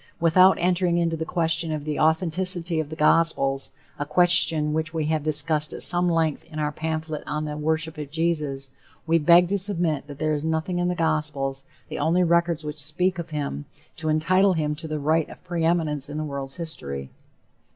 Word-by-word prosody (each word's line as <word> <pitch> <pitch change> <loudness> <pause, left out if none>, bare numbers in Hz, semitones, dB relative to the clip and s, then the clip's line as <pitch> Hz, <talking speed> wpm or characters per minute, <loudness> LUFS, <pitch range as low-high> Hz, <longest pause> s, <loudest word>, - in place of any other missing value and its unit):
Without 185 +3 +5
entering 180 0 +1
into 165 -1 0
the 160 0 -4
question 165 -1 -1
of 150 -1 -4
the 150 -1 -3
authenticity 170 +1 +3
of 155 -2 -3
the 155 - -7
gospels, 150 -4 +2 0.3
a - - 0
question 160 -2 +3
which 160 +1 -3
we 160 -2 -1
have 155 0 0
discussed 155 0 +1
at - - -1
some 175 0 +4
length 165 -3 0
in 160 -2 -11
our 150 -1 -1
pamphlet 160 0 -4
on 150 0 -3
the 150 0 -5
"Worship 160 +1 -2
of 150 -2 -6
Jesus," 150 -4 -1 0.3
we 165 0 +2
beg 170 +3 +5
to 200 0 +1
submit 170 -7 -1
that 145 -2 -9
there 155 0 0
is 150 0 -2
nothing 160 +3 -1
in 175 - 0
the 180 - -1
gospels, 150 -4 -2 0.2
the - - -6
only 175 +3 +2
records 170 -1 +1
which 150 0 -3
speak 175 +4 0
of 170 - -6
him, 140 - -4 0.3
to 155 -1 -1
entitle 185 +5 +3
him 150 -3 -1
to 155 +2 -6
the 155 0 -3
"right 155 +2 0
of - - -13
preeminence 165 -5 -1
in 150 - -5
the 155 - -2
world's 140 -2 -4
history." 70 - -4
160 Hz, 195 wpm, -24 LUFS, 150-170 Hz, 0.3 s, Without